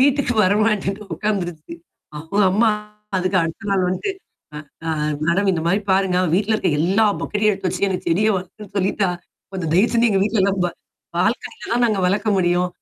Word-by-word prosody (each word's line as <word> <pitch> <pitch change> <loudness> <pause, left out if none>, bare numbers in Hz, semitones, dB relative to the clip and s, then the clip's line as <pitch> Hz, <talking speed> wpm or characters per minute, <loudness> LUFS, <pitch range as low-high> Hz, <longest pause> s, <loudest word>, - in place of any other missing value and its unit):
வீட்டுக்கு 275 -2 +2
வரமாட்டேன்னு 210 0 +1
உட்காந்துருச்சு. 175 -7 -3 0.4
அ - - -4 0.3
அம்மா 220 +4 +3 0.5
அதுக்கு 185 +1 0
அடுத்த 165 +6 -5
நாள் 190 -2 +2
வந்துட்டு. 285 - -2 0.4
அ - - -4 0.3
அ - - +1 0.4
மேடம் 190 +4 +2
இந்த 165 -3 -2
மாரி 195 +4 +2
பாருங்க 190 -1 +2 0.2
வீட்ல 210 +3 0
இருக்க 205 -4 +1
எல்லா 195 +6 +3 0.2
பக்கெட்டையும் 210 0 +1
எடுத்து 190 -1 -3
வச்சு 200 - 0
எனக்கு 185 -1 -4
செடிய 205 +6 +2
வளர்க்கன்னும்னு 190 +2 -9
சொல்லிட்டா, 195 0 +1 0.4
கொஞ்சம் 175 -5 -3
தயவு 200 +8 +3
செஞ்சு 235 0 +4
எங்க 195 - +2
வீட்ல 210 -2 +1
நம்ப. 190 -2 0 0.5
பால்கனில 455 - -2
தான் 245 0 +2
நாங்க 215 -4 0
வளர்க்க 205 +4 +1
முடியும். 175 0 +2
195 Hz, 170 wpm, -21 LUFS, 180-215 Hz, 0.5 s, செஞ்சு